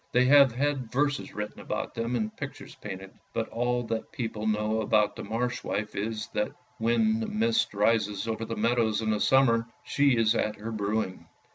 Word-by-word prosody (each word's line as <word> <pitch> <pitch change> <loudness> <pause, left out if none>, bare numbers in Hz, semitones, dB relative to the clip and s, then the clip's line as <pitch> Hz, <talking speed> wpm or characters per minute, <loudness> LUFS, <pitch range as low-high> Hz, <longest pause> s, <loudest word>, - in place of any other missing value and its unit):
They 125 +1 +5
have 140 -1 +7
had 130 -1 -1
verses 145 +2 0
written 105 0 -5
about - - -4
them 115 +2 -2
and 110 -2 -2
pictures - - -7
painted; 95 0 -8 0.2
but 115 -1 -2
all 120 +1 0
that 115 -1 -4
people 110 -7 -3
know 110 +1 +1
about 105 -1 +2
the - - -6
Marsh 115 +4 -2
wife, 105 0 -3
is 110 +1 -3
that 105 - 0 0.3
when 220 - +2
the 225 - -2
mist 225 - +1
rises 105 0 +1
over 115 0 -2
the 115 0 -4
meadows 115 -1 +1
in 110 - +1
the 105 - 0
summer, 115 -3 +4 0.2
she 140 -3 +3
is 110 -1 +4
at 105 -2 0
her 110 +2 -6
brewing. 105 -2 -2
115 Hz, 185 wpm, -28 LUFS, 105-125 Hz, 0.3 s, have